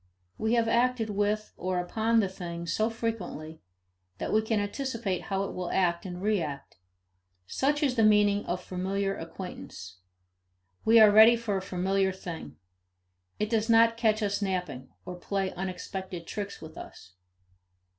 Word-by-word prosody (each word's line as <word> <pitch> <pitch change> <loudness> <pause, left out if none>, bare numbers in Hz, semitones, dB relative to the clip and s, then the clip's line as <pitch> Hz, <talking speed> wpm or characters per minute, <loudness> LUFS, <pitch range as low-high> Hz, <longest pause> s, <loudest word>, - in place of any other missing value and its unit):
We 220 +1 +1
have 230 -1 +2
acted 235 -1 +1
with 210 +1 -1
or 185 0 -2
upon 220 +6 +1
the 200 - 0
thing 170 -2 -6
so 215 +6 0
frequently 200 -9 -5 0.6
that - - -3
we 215 - +4
can 220 -1 0
anticipate 210 -3 -3
how 195 0 -1
it 195 - -5
will 180 -1 -4
act 175 -1 +1
and 180 -1 -6
react 170 - -2 0.7
such 290 - 0
is 265 -3 +2
the 225 - +3
meaning 210 -1 +4
of 180 +1 -2
familiar 195 +2 -2
acquaintance. 165 - -8 0.8
We 225 +1 +6
are 215 -1 +8
ready 220 +3 +8
for 230 -3 -2
a 190 - -1
familiar 190 +1 0
thing; 165 - -8 0.8
it 210 +1 -2
does 225 0 +1
not 230 0 +6
catch 220 -2 +1
us 205 0 -1
napping, 180 -9 -3 0.2
or 180 - -6
play 195 +1 -2
unexpected 185 -1 -5
tricks 205 +1 -6
with 160 0 -10
us. 95 -1 -12
200 Hz, 155 wpm, -28 LUFS, 180-220 Hz, 0.8 s, are